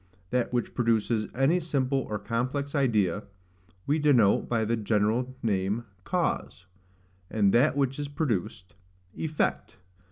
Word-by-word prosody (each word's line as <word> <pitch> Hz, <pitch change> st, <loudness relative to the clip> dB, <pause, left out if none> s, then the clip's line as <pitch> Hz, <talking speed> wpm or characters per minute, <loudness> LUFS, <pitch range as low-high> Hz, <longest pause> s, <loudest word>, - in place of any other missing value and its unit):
THAT 125 Hz, -1 st, 0 dB
WHICH 120 Hz, -1 st, -1 dB
PRODUCES 115 Hz, -2 st, +1 dB
ANY 135 Hz, +8 st, +3 dB
SIMPLE 135 Hz, -5 st, -1 dB
OR 105 Hz, -, -1 dB
COMPLEX 125 Hz, +7 st, -2 dB
IDEA 105 Hz, -, +1 dB, 0.6 s
we 150 Hz, +3 st, +1 dB
denote 130 Hz, -9 st, +3 dB
by 115 Hz, -2 st, +1 dB
the 115 Hz, +2 st, +1 dB
general 110 Hz, +4 st, 0 dB
name, 100 Hz, +1 st, 0 dB, 0.2 s
CAUSE, -, -, -2 dB, 0.6 s
and 100 Hz, -3 st, +2 dB
THAT 140 Hz, +4 st, +4 dB
WHICH 135 Hz, 0 st, 0 dB
IS 145 Hz, -, -3 dB
PRODUCED, 120 Hz, -, -3 dB, 0.4 s
EFFECT. 155 Hz, -10 st, -2 dB
120 Hz, 125 wpm, -28 LUFS, 105-140 Hz, 0.6 s, THAT